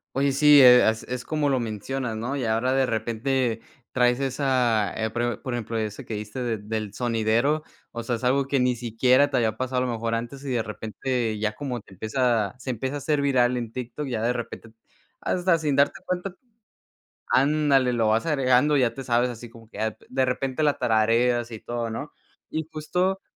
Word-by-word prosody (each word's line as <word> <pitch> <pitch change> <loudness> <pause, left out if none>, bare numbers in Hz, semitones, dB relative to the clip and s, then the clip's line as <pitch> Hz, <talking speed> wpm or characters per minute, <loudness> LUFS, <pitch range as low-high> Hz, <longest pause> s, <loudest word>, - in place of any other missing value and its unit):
Oye, 140 +1 +2
sí, 145 +1 +7
e 125 -1 +8
as 110 0 +2
es 125 -1 -4
como 150 0 0
lo 135 -2 +1
mencionas, 115 +2 -4
¿no? 120 +5 -3
Y 135 -4 -2
ahora 115 +4 +1
de 135 0 +3
repente 115 +1 -1 0.3
traes 125 0 +2
esa, 130 -5 +1
eh, 110 0 -1
pro 120 -1 -2
por 130 -3 -3
ejemplo, 115 -1 -5
esa 110 -2 -3
que - - -7
dijiste 105 +4 -5
de 115 -2 -1
del 105 0 -4
sonidero, 120 +6 +1 0.3
o 120 - -5
sea, 120 +1 -1
es 115 - -13
algo 135 +2 +2
que 140 0 +1
ni 125 0 +2
siquiera 125 +4 +2
te - - +1
había 110 -3 0
pasado 130 0 -1
a - - 0
lo - - -2
mejor 115 0 -2
antes, 120 +5 -4
y 135 - -3
de 120 -2 +1
repente 110 +1 -3
ya 105 0 -1
como 125 -4 -4
te 100 - -18
empieza 110 +1 0
se 130 - -7
empieza 130 +3 -3
a - - -1
hacer 145 +1 0
viral 125 -3 +2
en 120 -2 -4
TikTok, 130 +4 -5
ya 120 -4 -2
de 120 +2 +1
repente, 120 -1 -7 0.5
hasta 180 -1 +1
sin 150 -3 -1
darte 140 +1 +2
cuenta 180 +1 -3 1.0
Ándale, 140 -2 +3
lo 115 -2 +1
vas 110 +5 +2
agregando, 135 -1 +3
ya 125 -4 +2
te 135 - -7
sabes 120 0 +1
así 120 0 -8
como 115 -1 -16
que - - -10
a 110 0 0
p - - -22
de 130 0 +1
repente 130 +2 -2
la 145 -2 +2
tarareas 120 +2 +2
y 110 -2 -8
todo, 120 0 -4
¿no? 145 +7 -6 0.4
Y 160 0 -3
justo, 180 +5 -1
125 Hz, 210 wpm, -25 LUFS, 115-135 Hz, 1.0 s, e